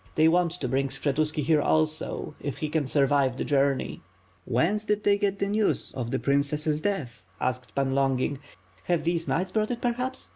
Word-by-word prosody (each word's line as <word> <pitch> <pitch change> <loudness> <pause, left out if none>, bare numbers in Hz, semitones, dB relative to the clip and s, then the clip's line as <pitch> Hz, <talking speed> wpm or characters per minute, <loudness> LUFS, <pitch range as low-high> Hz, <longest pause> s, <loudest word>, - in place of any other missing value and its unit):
They 155 - +5
want 170 0 +3
to 160 -7 -4
bring 135 +2 +1
Skshetuski 150 +3 -1
here 150 +1 +3
also 155 0 0
if 140 -3 -4
he 155 - -3
can 150 -3 0
survive 135 -2 +2
the - - -1
journey." 140 -2 +1 0.5
"And 125 - -3
whence 195 +11 +2
did 210 -1 -1
you 200 0 +5
get 200 -1 0
the 200 - -1
news 210 +1 0
of 120 -3 -3
the - - 0
princess' 150 +2 0
death 155 - -3
?*' - - -33
asked 125 -1 -3
Pan 135 -1 +1
Longin. 135 0 +1 0.5
"Have 175 -3 +1
these 170 0 0
knights 185 +2 0
brought 215 +1 0
it 240 - -2
per 240 0 +1
Tiaps?" 255 +2 -4
155 Hz, 205 wpm, -27 LUFS, 135-185 Hz, 0.5 s, They